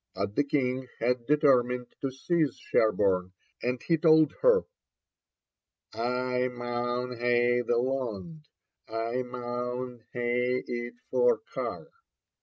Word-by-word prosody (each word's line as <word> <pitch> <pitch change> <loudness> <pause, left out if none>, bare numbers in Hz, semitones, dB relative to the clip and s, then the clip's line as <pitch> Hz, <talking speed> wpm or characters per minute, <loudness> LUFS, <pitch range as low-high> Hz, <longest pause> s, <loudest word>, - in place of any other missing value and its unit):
But 100 +1 -3
the 145 - +3
King 130 -2 -1
had 120 0 0
determined 125 -5 +3
to 135 - -1
seize 150 +1 0
Sherborne, 95 -4 +1 0.3
and 125 +1 -1
he 165 -2 +2
told 155 -2 +5
her, 485 -1 +5 1.3
'I 125 +1 0
maun 120 0 -3
hae 120 0 +3
the 120 -1 +1
lond, 135 - -3 0.4
I 115 +3 -2
maun 125 0 -5
hae 125 +1 0
it 120 0 -4 0.2
for 485 -2 +3
Carr.' - - -4
125 Hz, 110 wpm, -28 LUFS, 120-135 Hz, 1.3 s, told